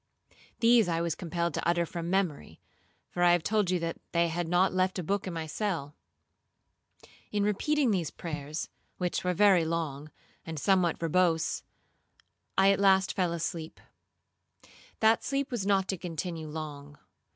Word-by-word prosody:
These 230 Hz, -2 st, +5 dB
I 165 Hz, -1 st, 0 dB
was 170 Hz, -1 st, 0 dB
compelled 170 Hz, -1 st, -2 dB
to -, -, -2 dB
utter 170 Hz, 0 st, +2 dB
from 170 Hz, 0 st, -5 dB
memory, 175 Hz, -, -1 dB, 0.5 s
for 175 Hz, -, -3 dB
I 175 Hz, 0 st, +6 dB
have 175 Hz, -2 st, +2 dB
told 210 Hz, -2 st, +1 dB
you 180 Hz, -, +2 dB
that 165 Hz, 0 st, -3 dB
they 170 Hz, 0 st, +3 dB
had 170 Hz, +1 st, -2 dB
not 180 Hz, +2 st, +3 dB
left 185 Hz, +1 st, +1 dB
a 180 Hz, -, -2 dB
book 200 Hz, +4 st, -1 dB
in 185 Hz, -, -4 dB
my 160 Hz, -1 st, -3 dB
cell. 160 Hz, -4 st, -3 dB, 1.4 s
In 205 Hz, -1 st, 0 dB
repeating 255 Hz, +6 st, +1 dB
these 175 Hz, -6 st, 0 dB
prayers, 155 Hz, -1 st, -5 dB, 0.3 s
which 180 Hz, -1 st, -2 dB
were 180 Hz, 0 st, 0 dB
very 195 Hz, -3 st, +5 dB
long, 155 Hz, -3 st, -3 dB, 0.3 s
and 160 Hz, -1 st, -6 dB
somewhat 180 Hz, +1 st, +2 dB
verbose, 165 Hz, 0 st, +1 dB, 1.0 s
I 195 Hz, +1 st, +6 dB
at 195 Hz, -, +1 dB
last 195 Hz, -1 st, +4 dB
fell 180 Hz, -3 st, 0 dB
asleep. 165 Hz, -1 st, -4 dB, 1.2 s
That 220 Hz, +1 st, +4 dB
sleep 275 Hz, 0 st, -2 dB
was 215 Hz, -6 st, -2 dB
not 195 Hz, -2 st, +2 dB
to 190 Hz, -, -1 dB
continue 165 Hz, -1 st, -4 dB
long. 145 Hz, -2 st, -7 dB
175 Hz, 160 wpm, -29 LUFS, 165-195 Hz, 1.4 s, I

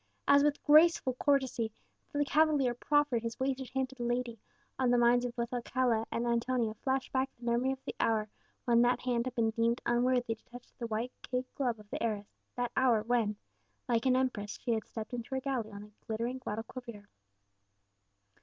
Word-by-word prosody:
As 280 Hz, 0 st, +6 dB
with 295 Hz, 0 st, +1 dB
graceful 305 Hz, -3 st, +5 dB
courtesy 265 Hz, -6 st, +1 dB, 0.4 s
the 290 Hz, 0 st, +1 dB
cavalier 295 Hz, -4 st, +3 dB
proffered 290 Hz, -1 st, +1 dB
his 230 Hz, 0 st, -5 dB
wasted 265 Hz, -1 st, -1 dB
hand 265 Hz, -1 st, -1 dB
to 265 Hz, -, -13 dB
the 245 Hz, -, -5 dB
lady, 240 Hz, -1 st, -2 dB, 0.4 s
on 255 Hz, -2 st, +3 dB
the 245 Hz, -, +4 dB
minds 240 Hz, +1 st, +4 dB
of 245 Hz, -1 st, -4 dB
both 235 Hz, +1 st, -3 dB
Alcala 240 Hz, -2 st, 0 dB
and 235 Hz, -, -1 dB
Antonia 235 Hz, -1 st, 0 dB
flashed 265 Hz, +4 st, -2 dB
back 265 Hz, 0 st, +1 dB
memory 240 Hz, +2 st, +1 dB
of 265 Hz, 0 st, -7 dB
the -, -, -4 dB
hour 220 Hz, -2 st, +1 dB, 0.4 s
when 235 Hz, -1 st, +4 dB
that 245 Hz, +1 st, +3 dB
hand 245 Hz, -1 st, 0 dB
had 250 Hz, -, -5 dB
been 225 Hz, -2 st, +2 dB
deemed 230 Hz, +2 st, +1 dB
unworthy 245 Hz, -1 st, +2 dB
to 220 Hz, -, -16 dB
touch 245 Hz, 0 st, -12 dB
the 235 Hz, -, -3 dB
white 225 Hz, +3 st, -2 dB
kid 255 Hz, 0 st, -2 dB
glove 250 Hz, -5 st, -1 dB
of 210 Hz, -, -14 dB
the -, -, -4 dB
heiress 210 Hz, -3 st, -2 dB, 0.2 s
that 245 Hz, -1 st, -1 dB
hour 240 Hz, -5 st, +3 dB
when, 225 Hz, -3 st, +1 dB, 0.5 s
like 235 Hz, +1 st, +1 dB
an 255 Hz, -, +4 dB
empress, 235 Hz, -6 st, -1 dB
she 240 Hz, -, 0 dB
had 220 Hz, -1 st, -1 dB
stepped 220 Hz, +1 st, -7 dB
into 245 Hz, +2 st, -4 dB
her -, -, +1 dB
galley 255 Hz, -5 st, -2 dB
on 200 Hz, 0 st, -8 dB
the 210 Hz, -, -14 dB, 0.2 s
glittering 235 Hz, +4 st, -2 dB
Guadalquivir. 225 Hz, -2 st, -7 dB
245 Hz, 190 wpm, -32 LUFS, 230-260 Hz, 0.5 s, As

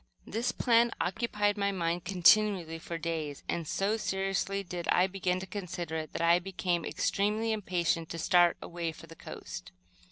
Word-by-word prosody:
This 230 Hz, +4 st, -1 dB
plan 235 Hz, 0 st, +4 dB
occupied 205 Hz, +1 st, 0 dB
my 200 Hz, 0 st, +1 dB
mind 170 Hz, -2 st, -1 dB
continually 180 Hz, -2 st, +4 dB
for 170 Hz, 0 st, -5 dB
days, 160 Hz, -3 st, -4 dB
and, 165 Hz, -2 st, -2 dB
so 200 Hz, +7 st, 0 dB
seriously 195 Hz, -1 st, -1 dB
did 175 Hz, -2 st, -5 dB
I 180 Hz, -, +4 dB
begin 185 Hz, -1 st, -1 dB
to -, -, -5 dB
consider 180 Hz, -4 st, -5 dB
it, 155 Hz, -1 st, -5 dB
that -, -, -2 dB
I 170 Hz, +1 st, +5 dB
became 180 Hz, -2 st, -1 dB
extremely 210 Hz, +7 st, 0 dB
impatient 175 Hz, -6 st, 0 dB
to 165 Hz, -, -5 dB
start 175 Hz, +1 st, +4 dB
away 170 Hz, -1 st, -4 dB
for 165 Hz, -, -12 dB
the 165 Hz, 0 st, -13 dB
coast. 90 Hz, -, -8 dB
180 Hz, 165 wpm, -30 LUFS, 170-200 Hz, -, I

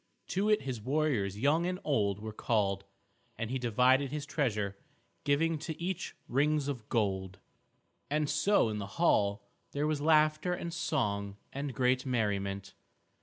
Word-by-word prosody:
To 200 Hz, +3 st, +1 dB
it 210 Hz, -9 st, +3 dB
his 130 Hz, -4 st, -4 dB
warriors 130 Hz, -7 st, 0 dB
young 150 Hz, +9 st, +2 dB
and 180 Hz, 0 st, -2 dB
old 105 Hz, -9 st, +1 dB
were 110 Hz, +1 st, -6 dB
called, 100 Hz, -3 st, 0 dB, 0.5 s
and 115 Hz, +1 st, -3 dB
he 130 Hz, -, -1 dB
divided 125 Hz, +3 st, +3 dB
his 150 Hz, -1 st, -3 dB
treasure, 110 Hz, -10 st, -1 dB, 0.5 s
giving 155 Hz, +3 st, +2 dB
to 160 Hz, 0 st, -5 dB
each 185 Hz, +1 st, -3 dB
rings 145 Hz, +2 st, +2 dB
of 125 Hz, -6 st, -5 dB
gold. 95 Hz, -5 st, 0 dB, 0.7 s
And 150 Hz, +1 st, +1 dB
so 150 Hz, -, +3 dB
in 105 Hz, -1 st, -3 dB
the 100 Hz, -, -4 dB
hall 100 Hz, -12 st, +3 dB, 0.3 s
there 145 Hz, +1 st, 0 dB
was 150 Hz, -1 st, 0 dB
laughter 155 Hz, +2 st, +3 dB
and 170 Hz, -1 st, -5 dB
song 100 Hz, -, -1 dB, 0.2 s
and 140 Hz, -1 st, -4 dB
great 125 Hz, 0 st, +2 dB
merriment. 100 Hz, -6 st, -1 dB
135 Hz, 150 wpm, -31 LUFS, 105-155 Hz, 0.7 s, it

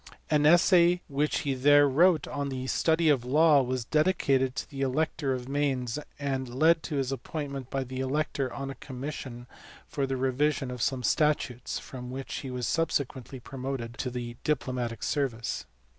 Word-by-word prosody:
An 150 Hz, -1 st, +4 dB
essay 175 Hz, +1 st, +5 dB
which 145 Hz, +1 st, 0 dB
he 140 Hz, -, -1 dB
there 145 Hz, +2 st, +5 dB
wrote 160 Hz, +3 st, +4 dB
on 140 Hz, -1 st, -3 dB
the 130 Hz, -1 st, -4 dB
study 160 Hz, +4 st, +2 dB
of 140 Hz, -5 st, +3 dB
law 150 Hz, +3 st, +5 dB
was 130 Hz, -2 st, -2 dB
dedicated 140 Hz, -5 st, +2 dB
to -, -, -4 dB
the 135 Hz, -3 st, -7 dB
elector 140 Hz, +1 st, 0 dB
of 125 Hz, -1 st, -6 dB
Mainz, 135 Hz, -3 st, -1 dB, 0.2 s
and 135 Hz, -3 st, -3 dB
led 160 Hz, +4 st, +4 dB
to 155 Hz, -, -5 dB
his 135 Hz, -2 st, -1 dB
appointment 140 Hz, -2 st, -5 dB
by 135 Hz, -1 st, -1 dB
the 130 Hz, 0 st, -6 dB
elector 135 Hz, -1 st, -1 dB
on 135 Hz, 0 st, -5 dB
a -, -, -5 dB
commis 135 Hz, +2 st, -6 dB
sion 120 Hz, -3 st, -8 dB, 0.4 s
for 140 Hz, -1 st, -2 dB
the 135 Hz, 0 st, -2 dB
revision 135 Hz, +1 st, 0 dB
of 125 Hz, -1 st, -6 dB
some 130 Hz, 0 st, 0 dB
statutes, 145 Hz, -2 st, 0 dB
from 125 Hz, -1 st, -8 dB
which 135 Hz, +1 st, -5 dB
he 135 Hz, -, -6 dB
was 125 Hz, -1 st, -3 dB
subsequently 135 Hz, -5 st, -1 dB
promoted 130 Hz, -2 st, -5 dB
to 130 Hz, -, -1 dB
the 120 Hz, -1 st, -6 dB
diplomatic 125 Hz, -6 st, -2 dB
service. 125 Hz, -6 st, -2 dB
135 Hz, 175 wpm, -28 LUFS, 130-150 Hz, 0.4 s, essay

